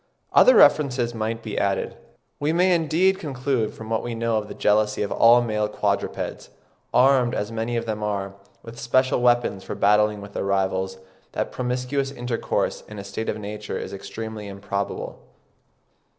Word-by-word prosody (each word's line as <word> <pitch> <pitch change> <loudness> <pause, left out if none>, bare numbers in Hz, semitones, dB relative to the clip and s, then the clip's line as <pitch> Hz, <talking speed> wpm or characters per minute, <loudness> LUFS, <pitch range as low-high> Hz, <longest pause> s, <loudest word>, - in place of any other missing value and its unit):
Other - - +7
references 125 -5 +4
might 115 0 -3
be 110 - -3
added.) 100 -1 -1 0.4
We 145 +2 +1
may 180 +2 +4
indeed 175 +4 +2
conclude 130 -5 -2
from 110 0 -9
what 110 - +1
we 120 -1 -4
know 115 -1 0
of 105 -1 -3
the - - -8
jealousy 105 0 +2
of 100 - -4
all 120 +1 +6
male 105 -2 0
quadrupeds, - - -2 0.4
armed, 125 -1 +4
as 105 +2 -3
many 115 +1 -2
of 115 - -2
them 110 -1 -3
are, 100 -2 -2 0.3
with 115 0 -10
special 130 +1 +2
weapons 120 -5 +2
for - - -6
battling 105 +1 +3
with 100 0 -10
their - - -2
rivals, 95 -1 -1 0.4
that - - -2
promiscuous 125 +2 -2
intercourse 120 -3 -2
in 105 - -10
a 100 - -6
state 100 +3 -4
of - - -2
nature 105 0 -5
is 95 - -6
extremely 110 +1 -7
improbable. 100 0 -4
115 Hz, 165 wpm, -24 LUFS, 105-125 Hz, 0.4 s, Other